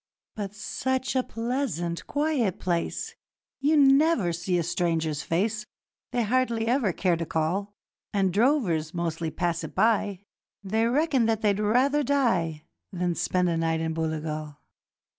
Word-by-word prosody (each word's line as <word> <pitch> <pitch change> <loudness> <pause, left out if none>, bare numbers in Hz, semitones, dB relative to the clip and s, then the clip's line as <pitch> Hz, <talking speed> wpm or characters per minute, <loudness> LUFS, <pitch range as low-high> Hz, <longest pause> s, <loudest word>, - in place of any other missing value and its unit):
'But 205 -1 -5
such 260 +5 -2
a 260 - +4
pleasant, 230 - -3
quiet 290 - 0
place, 170 -2 -2 0.5
You 300 +3 +3
never 275 - +4
see 175 +2 -1
a 170 - +1
stranger's 165 -3 -1
face 215 +5 -1 0.4
They 245 -1 0
hardly 235 0 +1
ever 235 -4 +2
care 180 0 +1
to 165 0 -3
call; 185 +7 -1 0.4
The 200 -2 +1
drovers 190 - +1
mostly 165 -1 -2
pass 170 +1 -1
it - - -7
by; 205 -4 +2 0.4
They 220 +4 +1
reckon 265 -2 +2
that 220 -1 +1
they'd 205 -1 +2
rather 255 +8 +3
die 190 - +1 0.3
Than 180 -2 -1
spend 180 +2 0
a 170 -1 0
night 165 0 0
in 160 0 -1
Booligal. 155 -2 -3
200 Hz, 140 wpm, -26 LUFS, 170-245 Hz, 0.5 s, a